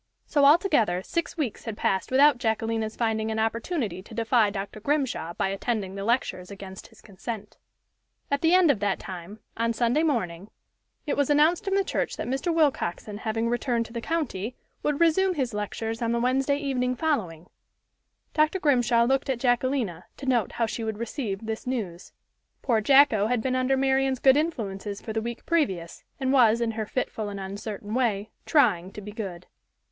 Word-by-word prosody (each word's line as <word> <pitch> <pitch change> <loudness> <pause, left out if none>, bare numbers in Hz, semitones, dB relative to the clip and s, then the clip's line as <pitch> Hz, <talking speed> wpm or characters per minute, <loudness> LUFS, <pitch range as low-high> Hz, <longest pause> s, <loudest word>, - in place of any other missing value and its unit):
So, 285 -3 +3
altogether, 280 - +4
six 335 - -3
weeks 275 -9 -3
had 225 -3 -5
passed 190 -1 0
without 275 0 +5
Jacquelina's 225 -1 -1
finding 220 -1 0
an 220 - -2
opportunity 225 - -1
to 220 +3 -12
defy 225 -1 +3
Dr. 200 +1 -5
Grimshaw 260 - -1
by 195 - 0
attending 195 -1 -2
the 195 0 -5
lectures 205 -5 -1
against 195 -1 -9
his - - -20
consent. 210 +1 -7 0.7
At 280 - +1
the 330 +2 +4
end 360 -5 +6
of 240 - -2
that 200 -1 0
time, 190 +2 -9 0.2
on 230 0 +1
Sunday 240 +6 +2
morning, 205 - -1 0.6
it 295 - 0
was 285 -1 +1
announced 310 +6 +3
in 390 - +1
the 395 - +3
church - - -2
that - - -3
Mr. 270 +7 -1
Willcoxen 260 - 0
having 225 +1 -1
returned 240 0 0
to 230 - -12
the 235 - -4
county, 255 - -2 0.3
would 295 -1 0
resume 360 +3 +3
his 255 -6 -1
lectures 225 +2 -3
on 230 0 0
the 235 - +1
Wednesday 265 +3 +1
evening 255 -3 -1
following. 205 - -1 0.9
Dr. 310 +4 +2
Grimshaw 245 -6 +3
looked 270 +3 +1
at 260 - +1
Jacquelina, 245 -8 0
to 275 - -8
note 245 -6 +1
how 230 - +1
she 225 +1 -4
would 220 -1 -3
receive 225 -3 -4
this 220 +2 -5
news. 195 -9 -4 0.5
Poor 230 -4 +2
Jacko 235 -4 +5
had 245 0 +1
been 255 +3 -1
under 255 +1 +2
Marian's 265 0 +2
good 265 +1 +5
influences 210 -10 -2
for 220 - -6
the 220 - -1
week 235 +1 -6
previous, 190 - -1 0.2
and 265 0 +1
was, 235 -4 +5
in 235 -1 0
her 220 -1 -4
fitful 220 -4 -3
and 200 -1 -6
uncertain 205 +2 -6
way, 220 -4 0 0.2
"trying 205 - +3
to - - -7
be 210 0 -8
good." 190 -5 -6
230 Hz, 185 wpm, -26 LUFS, 210-270 Hz, 0.9 s, end